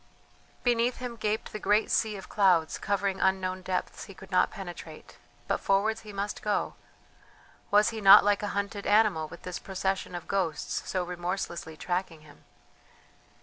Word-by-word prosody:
Beneath 240 0 +2
him 250 -2 -6
gaped 215 -1 -2
the 215 - -5
great 210 +1 +2
sea 215 -2 +1
of 190 - -10
clouds 180 -6 +2
covering 200 -1 -1
unknown 185 -1 +1
depths 185 0 -3
he 195 - -12
could 195 - -14
not 185 - +3
penetrate; 175 -5 -10 0.3
but - - 0
forwards 210 +3 +1
he 215 - -10
must 200 +1 -4
go! 210 -1 -1 1.0
Was 210 +1 +5
he 225 -1 -6
not 195 -1 +9
like 205 -1 +2
a 205 - -2
hunted 200 0 -3
animal 205 -7 +3
with 175 - -12
this 180 -1 -5
procession 190 -1 -3
of 175 - -7
ghosts 175 -6 -2
so 185 -1 0
remorselessly 175 -2 -4
tracking 175 -3 -3
him? 150 -1 -18
195 Hz, 160 wpm, -28 LUFS, 180-210 Hz, 1.0 s, not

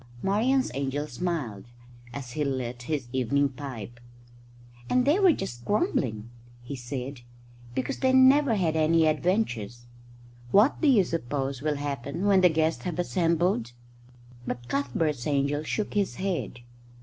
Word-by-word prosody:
Marian's 245 +7 +2
angel 140 +2 -2
smiled 145 - -4 0.5
as 125 -1 -7
he 150 +4 -1
lit 125 -3 -3
his 135 -1 -3
evening 140 +3 +1
pipe. 125 -4 -8 0.9
"And 250 0 +3
they 300 +7 +3
were 380 -3 +6
just 120 - -4
grumbling," 120 - -1 0.3
he 140 +3 -6
said, 125 +1 -6 0.5
"because 130 -1 -2
they 260 -1 +3
never 260 -1 +5
had 170 -5 0
any 160 +1 +3
adventures. 150 - -1 0.6
What 210 - +4
do 315 - +3
you 240 -8 +6
suppose 140 -5 -3
will 150 0 0
happen 140 +4 -4
when 195 -2 +5
the 180 - +6
guests 160 0 0
have 175 -3 -3
assembled?" 170 - 0 0.7
But 120 0 -4
Cuthbert's 140 +1 -1
angel 140 0 +1
shook 205 +7 -3
his 205 -2 0
head. 185 -9 -3
150 Hz, 135 wpm, -27 LUFS, 125-185 Hz, 0.9 s, were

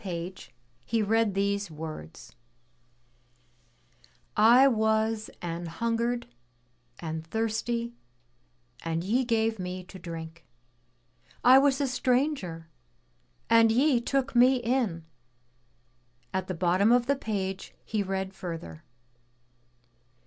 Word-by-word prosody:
page 180 -1 -6 0.3
he 230 - -1
read 220 -1 +2
these 200 0 0
words: 155 - -9 2.0
"I 240 +5 +7
was 220 -2 +1
an 170 0 -4
hungered 235 +6 -1 0.7
and 160 -1 -5
thirsty 225 +3 -2 0.9
and 165 0 -2
ye 235 +8 +1
gave 225 -2 0
Me 185 0 -5
to 185 +1 -12
drink. 165 -1 -8 1.0
I 255 +2 +8
was 275 -1 +3
a 285 - +1
stranger 250 - -1 0.8
and 230 0 +5
ye 255 +1 +3
took 270 +1 -1
Me 250 +2 +6
in." 235 -9 -1 1.3
At 190 0 -2
the 185 - -3
bottom 185 +5 +3
of 245 0 +4
the 280 +3 +2
page 195 -6 -4
he 215 -2 -1
read 190 0 -3
further. 165 - -7
215 Hz, 105 wpm, -28 LUFS, 180-240 Hz, 2.0 s, I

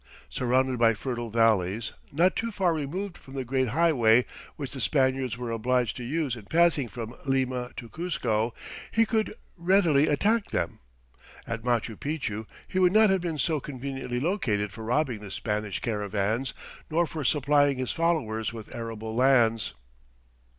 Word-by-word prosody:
Surrounded 130 0 +1
by 115 -1 +5
fertile 120 +1 -4
valleys, 110 -2 +2 0.2
not 175 +6 +3
too 230 - -1
far 190 -5 +1
removed 170 +6 -3
from 135 - -13
the 130 -1 -3
great 130 +1 +1
highway 125 -5 +4 0.3
which 140 -3 -5
the 135 - -5
Spaniards 130 -3 +1
were 120 -1 -4
obliged 120 +1 +1
to 125 - -6
use 140 0 -1
in 115 - -9
passing 165 -2 +3
from 115 +1 -7
Lima 130 -2 0
to 120 - -6
Cuzco, 120 -8 -1 0.4
he 225 0 +3
could 220 -1 0 0.2
readily 170 -5 +3
attack 210 +9 +2
them. 85 -2 -2 0.7
At 115 -1 -4
Machu 120 -2 0
Picchu 110 -8 -3 0.2
he 185 - -1
would 180 -1 +5
not 215 -1 +6
have 190 -2 +2
been 170 -3 -3
so 155 +2 +1
conveniently 135 -2 -4
located 125 - 0
for 110 +3 -9
robbing 125 0 0
the 105 -1 -9
Spanish 105 0 -2
caravans 105 +2 -1 0.3
nor 170 +2 +2
for 155 -2 -5
supplying 145 0 +3
his 130 -1 -1
followers 140 -11 0
with 115 -2 -9
arable 115 -1 -5
lands. 120 -3 +3
130 Hz, 155 wpm, -27 LUFS, 115-155 Hz, 0.7 s, not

